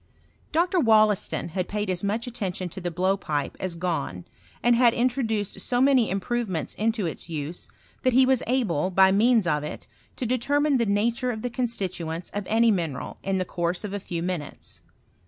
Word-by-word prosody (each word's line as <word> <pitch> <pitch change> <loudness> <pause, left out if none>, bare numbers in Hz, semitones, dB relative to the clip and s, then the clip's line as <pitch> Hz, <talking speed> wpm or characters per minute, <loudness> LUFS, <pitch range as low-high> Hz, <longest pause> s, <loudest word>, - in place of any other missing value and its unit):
Dr. 350 +3 +2
Wollaston 215 - +3
bad 185 -1 -1
paid 210 0 -2
as 185 0 -1
much 215 +4 -1
attention 190 -7 -3
to 190 - -8
tbe 175 -2 -4
blowpipe 180 -6 0
as 185 -2 -3
Gahn, 165 - -2 0.4
and 240 0 +5
hod 240 -1 +5
introduced 235 -5 0
so 245 -1 0
many 260 -3 +4
im 195 +2 0
provements 200 - -2
into 220 -2 0
its 165 +1 -5
use, 155 +1 -4 0.3
that 255 - +2
he 260 +1 +6
was 260 -1 +3
able, 195 - +1
by 190 0 +5
meavs 220 +1 +4
of 150 -3 +1
it, 150 - -6 0.3
to 255 - -3
determine 280 +4 +2
the 235 - +1
nature 230 +5 +1
of 220 -3 -4
the 245 - -2
constituents 185 -9 -3
of 205 -2 -4
any 230 +1 +4
mineral 165 -9 -3
in 195 0 -1
the 185 - -1
course 175 +2 -2
of 205 -1 -5
a. 205 - -2
few 170 -3 -4
minutes. 175 -5 -4
205 Hz, 185 wpm, -25 LUFS, 175-240 Hz, 0.4 s, he